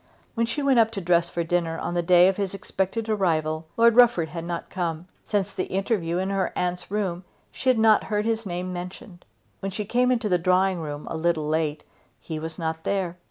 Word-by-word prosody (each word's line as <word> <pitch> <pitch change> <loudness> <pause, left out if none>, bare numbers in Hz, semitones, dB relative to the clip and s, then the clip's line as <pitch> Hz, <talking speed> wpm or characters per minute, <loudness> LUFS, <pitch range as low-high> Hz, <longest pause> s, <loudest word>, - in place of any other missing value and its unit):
When 230 0 0
she 255 +6 -2
went 270 -3 +4
up 225 -1 +5
to 200 - -3
dress 170 -1 +2
for 170 - -2
dinner 165 -1 -1
on 175 - -3
the 175 - +1
day 175 +1 +6
of 190 - +1
his 200 -1 -2
expected 195 +2 -3
arrival 160 -6 0
Lord 230 0 +5
Rufford 230 -10 +5
had 165 -1 -6
not 170 0 -5
come. 170 -2 -3 0.2
Since 200 -2 -1
the 185 - -2
interview 190 -3 -1
in 190 +2 -1
her 195 -1 0
aunt's 180 0 -2
room 190 -3 -2 0.3
she 260 - -1
had 255 - +4
not 220 -1 +4
heard 210 -1 -1
his 225 0 0
name 180 -1 -4
mentioned. 180 0 -8 0.3
When 195 - -3
she 205 +2 -4
came 250 +4 +2
into 235 -3 +1
the 180 -3 +2
drawing 185 +1 +2
room, 150 -2 -6
a - - -2
little 160 -2 0
late, 155 -1 -1 0.4
he 160 -2 -6
was 160 +1 -6
not 160 -1 -3
there. 185 -3 -1
180 Hz, 215 wpm, -25 LUFS, 170-210 Hz, 0.4 s, day